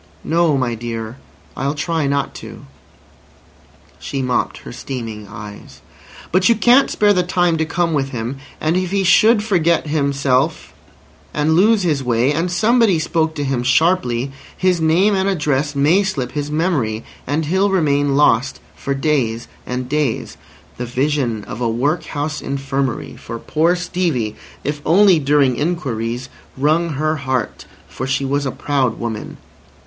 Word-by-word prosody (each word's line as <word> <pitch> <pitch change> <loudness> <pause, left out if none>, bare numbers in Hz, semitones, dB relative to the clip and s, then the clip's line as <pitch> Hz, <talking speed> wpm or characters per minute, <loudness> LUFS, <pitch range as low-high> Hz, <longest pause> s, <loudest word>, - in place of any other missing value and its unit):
"No, 165 -3 +2
my 125 -3 0
dear. 115 0 -5 0.4
I'll 140 +2 -2
try 160 0 -1
not 140 0 -1
to." - - -10 1.3
She 135 -2 -4
mopped 125 -1 -1
her - - -10
streaming 115 -6 -6
eyes. 105 0 -11 0.5
"But 185 +3 +3
you 235 - +5
can't 245 +5 +5
spare 205 -1 +3
the 180 - +2
time 175 -1 +1
to 160 - +1
come 170 +1 0
with 135 -2 0
him, 120 +1 -4 0.2
and 155 +2 0
if 185 -1 0
he 195 +1 0
should 210 +4 +5
forget 170 -7 +2
himself 140 -3 0 0.6
and 150 +1 +2
lose 205 +3 +4
his 150 -6 0
way 125 +3 +2
and 165 +4 -1
somebody 220 0 +3
spoke 160 0 0
to 145 - -2
him 135 -3 -1
sharply, 130 -2 +2 0.3
his 185 -2 +1
name 175 +6 +3
and 190 0 +1
address 150 -5 0
may 150 +8 +4
slip 140 -11 -2
his 145 -1 -3
memory, 150 -9 0 0.2
and 150 +4 0
he'll 190 +6 +2
remain 145 -6 +2
lost 140 -2 +3 0.2
for 140 - -3
days 135 -6 0 0.2
and 125 0 -3
days—" 150 -5 -1 0.4
The 125 - -3
vision 125 -3 -1
of 105 - -8
a 120 - +1
workhouse 145 +4 -2
infirmary 135 -2 -3
for 115 - -7
poor 160 +8 +1
Stevie—if 150 - -3
only 185 +1 +5
during 140 -3 +2
inquiries—wrung 145 +2 -2
her 155 +3 0
heart. 130 -5 -3 0.2
For 130 - -5
she 135 +1 0
was 140 +1 0
a - - -1
proud 135 -5 -1
woman. 115 -2 -5
145 Hz, 150 wpm, -19 LUFS, 130-170 Hz, 1.3 s, you